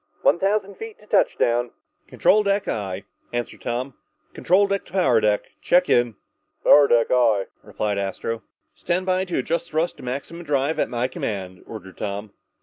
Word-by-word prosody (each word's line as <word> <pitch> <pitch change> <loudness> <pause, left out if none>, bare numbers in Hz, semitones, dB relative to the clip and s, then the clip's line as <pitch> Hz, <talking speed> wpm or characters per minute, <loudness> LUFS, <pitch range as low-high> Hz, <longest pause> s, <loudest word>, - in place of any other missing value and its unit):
"One - - +4
thousand 200 +1 0
feet 445 -1 -8
to - - -19
touchdown!" 120 - +2 0.4
"Control 215 - +3
deck, 200 0 0
aye," 100 -3 -3 0.3
answered 120 0 -4
Tom. 125 +3 -3 0.4
"Control 190 +3 +3
deck 200 0 -1
to - - -17
power 150 - +3
deck. 105 -1 0
Check 180 +1 +3
in." 120 -2 +3 0.5
"Power 145 -1 +7
deck, 120 -3 +3
aye," 115 -6 +3 0.2
replied 105 -2 -2
Astro. 100 +3 -3 0.3
"Stand 180 +1 -2
by 185 0 +1
to 180 - -3
adjust 170 +5 -1
thrust 160 +3 -1
to - - -12
maximum 140 +7 -5
drive 145 0 0
at - - +1
my 120 +1 -1
command," 95 -7 -5
ordered 95 -4 -10
Tom. 100 +1 -4
125 Hz, 165 wpm, -23 LUFS, 110-180 Hz, 0.5 s, Power